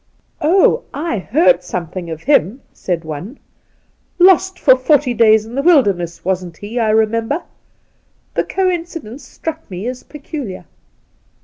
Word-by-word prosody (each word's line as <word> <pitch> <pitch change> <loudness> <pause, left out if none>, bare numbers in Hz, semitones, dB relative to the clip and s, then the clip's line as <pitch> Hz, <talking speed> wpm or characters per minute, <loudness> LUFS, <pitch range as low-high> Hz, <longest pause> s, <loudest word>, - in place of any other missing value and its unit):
' - - -43
Oh, 375 +9 +3
I 295 -8 -2
heard 315 - +2
something 175 0 -5
of 160 0 -7
him,' 260 - +2
said 175 -2 -3
one. 160 - -7 0.4
' - - -43
Lost 375 0 +2
for 260 -7 +5
forty 260 0 +2
days 220 -2 +4
in 225 - -11
the 275 - -1
wilderness, 200 - +2
wasn't 180 -3 -2
he 210 +4 -7
1 230 - +2
I - - +1
remember. 225 +7 +1 0.9
The - - 0
coincidence 335 - -3
struck 320 0 -7
me 185 +2 -6
as 250 +1 -4
peculiar.' 280 - -8
235 Hz, 145 wpm, -17 LUFS, 190-300 Hz, 0.9 s, for